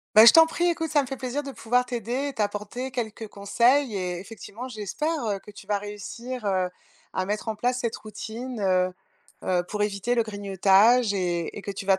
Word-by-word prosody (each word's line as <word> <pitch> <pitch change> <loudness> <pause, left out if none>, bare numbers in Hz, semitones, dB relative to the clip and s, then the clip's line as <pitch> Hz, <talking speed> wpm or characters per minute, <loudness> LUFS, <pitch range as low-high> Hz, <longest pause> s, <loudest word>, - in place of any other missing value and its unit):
Ben, 220 +2 +10
je - - +12
t'en 325 0 +9
prie, 335 +2 -1
écoute, 325 -2 -1
ça 295 -2 +4
me 270 - -6
fait 270 0 -5
plaisir 260 +2 -2
de 280 -1 -7
pouvoir 250 0 +1
t'aider 245 +3 -2
et 280 - -4
t'apporter 210 +4 -3
quelques 225 -3 -4
conseils 235 +5 +2
et 180 -2 -2
effectivement, 225 +4 -8
j'espère, 220 +5 -3 0.2
heu, 200 -2 -1
que 210 - -15
tu 205 -1 -12
vas 205 0 0
réussir, 215 +4 -7
heu, 185 -2 +1 0.4
à 185 - -1
mettre 210 +3 -3
en 220 - -1
place 245 +3 0
cette 235 -2 -2
routine, 225 +3 -7
heu, 185 -1 +2 0.5
heu, 180 -1 +2
pour 210 0 -2
éviter 210 +3 0
le 235 - +3
grignotage 205 +2 +4
et 175 -4 -1
et - - -6
que 200 - -5
tu 195 0 -6
vas 190 -1 +4
215 Hz, 210 wpm, -26 LUFS, 200-250 Hz, 0.5 s, je